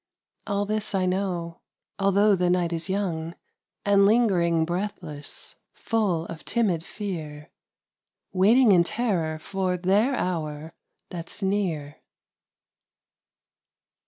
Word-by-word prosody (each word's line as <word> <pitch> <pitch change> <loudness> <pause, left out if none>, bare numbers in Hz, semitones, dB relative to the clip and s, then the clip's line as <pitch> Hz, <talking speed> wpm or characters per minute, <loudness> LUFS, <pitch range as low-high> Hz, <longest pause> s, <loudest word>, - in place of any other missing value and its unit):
All 200 0 0
this 215 0 -1
I 185 -1 +1
know, 180 -3 -2 0.4
although 200 +1 +4
the 180 -1 +1
night 175 -1 +1
is 165 +1 -2
young 175 -4 -2 0.5
And 200 -1 +5
ling'ring 180 -8 +3
breathless, 175 -5 -5 0.2
full 200 -8 0
of 165 -2 -8
timid 190 -9 0
fear, 155 -8 -6 0.8
Waiting 215 +5 +5
in 175 -3 +6
terror 175 -7 -1
for 185 +2 -2
their 200 +9 +2
hour 160 -5 -3 0.4
that's 175 +4 -6
near. 175 -8 -1
185 Hz, 100 wpm, -25 LUFS, 165-205 Hz, 0.8 s, in